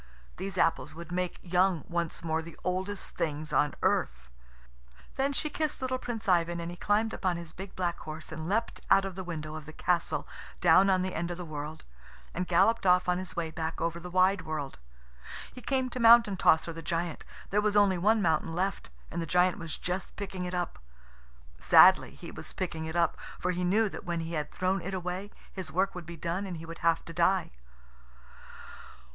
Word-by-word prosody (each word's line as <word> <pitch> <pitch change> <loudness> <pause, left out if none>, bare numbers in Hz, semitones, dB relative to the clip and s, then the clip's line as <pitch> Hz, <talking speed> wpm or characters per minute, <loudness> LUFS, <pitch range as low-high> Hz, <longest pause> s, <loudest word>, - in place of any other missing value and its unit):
These 190 0 -5
apples 165 - +1
would 170 +1 -9
make 180 0 -2
young 180 -2 +2
once 170 -1 -2
more 160 -1 0
the 165 0 -11
oldest 190 +2 -2
things 155 0 -2
on 150 0 +2
earth." 60 - 0 0.8
Then 270 +1 +1
she 280 - -1
kissed 305 0 -2
little 260 0 -2
Prince 230 -4 -5
Ivan, 170 -2 +2
and 170 0 -4
he - - -7
climbed 210 +4 +1
up - - -7
on 180 -2 +1
his 170 -2 -8
big 190 +1 -9
black 175 -2 -1
horse, 155 0 -8
and 160 +1 -5
leapt 220 +4 -1
out 195 0 +6
of 195 - -4
the 190 +1 -6
window 155 -3 -5
of 155 -1 -8
the - - -7
castle 175 +1 0 0.3
down 180 +3 +6
on 185 -1 +3
the 185 - -3
end 170 +2 -2
of 175 - -4
the 180 - -6
world, 155 0 -6 0.5
and 180 +1 -2
galloped 195 +4 +3
off 180 0 +5
on 180 0 +2
his 185 -3 -7
way 165 -2 -2
back 160 0 -4
over 170 0 -1
the 180 +1 -8
wide 185 +2 +3
world. 155 -3 -5 0.7
He 250 - -10
came 260 0 0
to 255 - -4
Mountain 230 -4 +7
tosser, 165 -1 +3
the 165 - -7
giant. 170 0 -2 0.3
There 205 +1 +3
was 210 0 +1
only 200 -3 +4
one 215 +3 +3
mountain 165 -1 +1
left, 190 - -2 0.2
and 170 - -2
the 165 - -4
giant 180 +2 +3
was 165 -2 -5
just 180 +1 -3
picking 190 -2 -5
it 180 0 -3
up. 175 -1 -3 0.8
Sadly - - +7
he - - -9
was - - -7
picking 165 -3 -3
it 160 - -6
up, 170 -1 +2 0.2
for - - -1
he 180 0 -2
knew 210 +5 +3
that - - -8
when 170 -3 -2
he 165 +1 -5
had 150 -2 -2
thrown 185 +1 0
it 190 +3 -4
away 180 +2 -4 0.2
his 190 -2 -5
work 190 +3 +1
would 175 -3 -8
be 170 -1 -8
done 170 +5 -2
and 180 -3 -5
he 160 - -8
would 165 +1 -8
have 165 -1 +2
to 165 - -8
die. 180 +3 +2
180 Hz, 210 wpm, -29 LUFS, 165-195 Hz, 0.8 s, Mountain